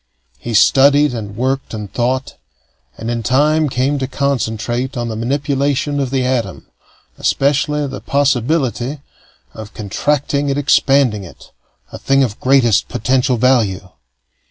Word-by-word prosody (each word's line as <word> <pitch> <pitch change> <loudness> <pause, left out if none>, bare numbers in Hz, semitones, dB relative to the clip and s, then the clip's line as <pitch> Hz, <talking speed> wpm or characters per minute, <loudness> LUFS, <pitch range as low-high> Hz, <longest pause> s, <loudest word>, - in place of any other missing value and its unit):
He 120 -1 -4
studied 140 +4 +4
and 105 -3 -6
worked 130 0 -2
and 105 -3 -7
thought, 130 +2 -1 0.6
and 115 +1 -4
in 120 -1 -2
time 150 +6 +2
came 135 +3 0
to 130 - -2
concentrate 130 -2 -2
on 120 -1 -3
the 110 - -4
manipulation 140 +3 -1
of 135 -2 -1
the 130 -1 -1
atom, 125 -2 -2 0.5
especially 145 +1 +1
the 135 -1 -6
possibility 140 -1 0 0.5
of 110 0 -10
contracting 140 +7 -1
and 140 - -1
expanding 135 -6 +2
it 90 - -14 0.4
a - - -8
thing 135 0 +2
of 110 -5 -3
greatest 130 -5 +3
potential 125 +2 0
value. 110 -7 +1
130 Hz, 130 wpm, -17 LUFS, 115-140 Hz, 0.6 s, studied